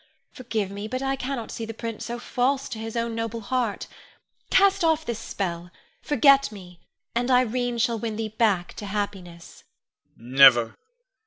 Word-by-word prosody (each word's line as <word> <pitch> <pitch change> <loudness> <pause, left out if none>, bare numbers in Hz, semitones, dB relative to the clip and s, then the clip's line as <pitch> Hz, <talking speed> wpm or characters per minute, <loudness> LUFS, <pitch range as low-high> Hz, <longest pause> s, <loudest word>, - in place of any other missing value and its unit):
Forgive 225 -6 -3
me, 200 +1 -6
but 255 +4 -4
I 270 0 0
cannot 260 -3 -4
see 230 - -5
the 225 0 -6
prince 230 -1 -5
so 240 0 -4
false 260 +3 -1
to 220 - -6
his 225 +1 -6
own 230 0 -1
noble 230 0 -4
heart. 235 -1 -2 0.6
Cast 395 -1 +4
off 320 -1 +2
this 235 -2 -3
spell; 175 -5 -4 0.3
forget 275 -1 +4
me, 180 -4 -12 0.3
and 240 +2 -1
Irene 250 -1 +1
shall 230 0 +1
win 220 -1 -3
thee 220 0 -3
back 200 -6 +1
to 205 - -6
happiness. 195 -4 -6 0.5
Con. 120 +2 -13
Never! 130 -4 +7
225 Hz, 165 wpm, -25 LUFS, 200-250 Hz, 0.6 s, Never